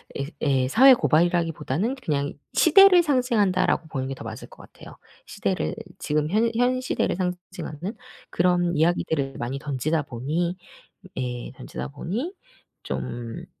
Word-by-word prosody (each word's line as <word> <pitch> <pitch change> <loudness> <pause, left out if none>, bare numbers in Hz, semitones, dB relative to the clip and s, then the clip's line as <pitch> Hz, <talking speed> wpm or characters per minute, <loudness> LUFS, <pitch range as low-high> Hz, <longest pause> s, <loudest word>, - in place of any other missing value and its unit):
예, 140 - -2 0.2
예. 135 -3 +2
사회 265 - +8
고발이라기보다는 170 - +1
그냥 145 - -2 0.2
'시대를 365 +1 +7
상징한다.'라고 220 - +1
보는 130 -2 -3
게 135 - -4
더 - - -10
맞을 - - -8
것 - - -17
같아요. - - -14 0.3
시대를 - - -2 0.2
지금 150 +1 0
현 220 +4 +2
현 250 +2 +2
시대를 255 - -1
상징하는 180 -1 -5 0.4
그런 175 0 +2
이야기들을 155 -4 0
많이 125 +3 -4
던지다 150 +2 -1
보니 155 +8 -2 0.6
예 125 -1 -4
던지다 65 +1 -7
보니 235 - -4 0.5
좀 120 -1 -5
170 Hz, 300 characters per minute, -24 LUFS, 140-215 Hz, 0.6 s, 사회